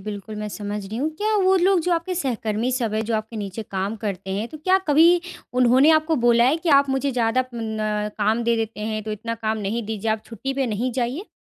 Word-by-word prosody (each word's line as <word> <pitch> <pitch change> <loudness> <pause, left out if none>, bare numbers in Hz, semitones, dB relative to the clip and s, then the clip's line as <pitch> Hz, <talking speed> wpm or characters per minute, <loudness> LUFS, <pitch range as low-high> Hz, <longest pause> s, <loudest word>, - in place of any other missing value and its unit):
बिल्कुल 210 +1 -7
मैं 210 0 -4
समझ 205 -1 -5
रही 215 +3 -6
हूँ। 285 +5 0
क्या 425 +4 0
वो 375 +1 +4
लोग 370 0 +3
जो 360 - 0
आपके 340 +2 -1
सहकर्मी 235 - -1
सब 235 -4 -1
हैं, 220 - 0
जो 225 +1 -1
आपके 220 +1 -5
नीचे 205 +1 -5
काम 195 +2 -2
करते 195 -3 -5
हैं, 215 +3 -2
तो 310 - -10
क्या 370 +5 +3
कभी 330 +4 +6 0.3
उन्होंने 255 +4 +5
आपको 315 0 +3
बोला 235 0 +5
है 275 +6 +3
कि 330 0 -4
आप 280 -1 +5
मुझे 270 +1 0
ज़्यादा 240 +1 +1
प 255 - -16
न 215 -2 -2
काम 215 +3 +1
दे 235 0 +2
देते 225 -1 -3
हैं, 215 0 -3
तो 215 - -3
इतना 230 +2 -4
काम 220 -1 -2
नहीं 215 +3 -2
दीजिए, 220 0 -2
आप 220 0 -1
छुट्टी 255 +4 -5
पे 270 -1 0
नहीं 235 +3 -2
जाइए? 255 - -2
230 Hz, 240 wpm, -23 LUFS, 215-275 Hz, 0.3 s, कभी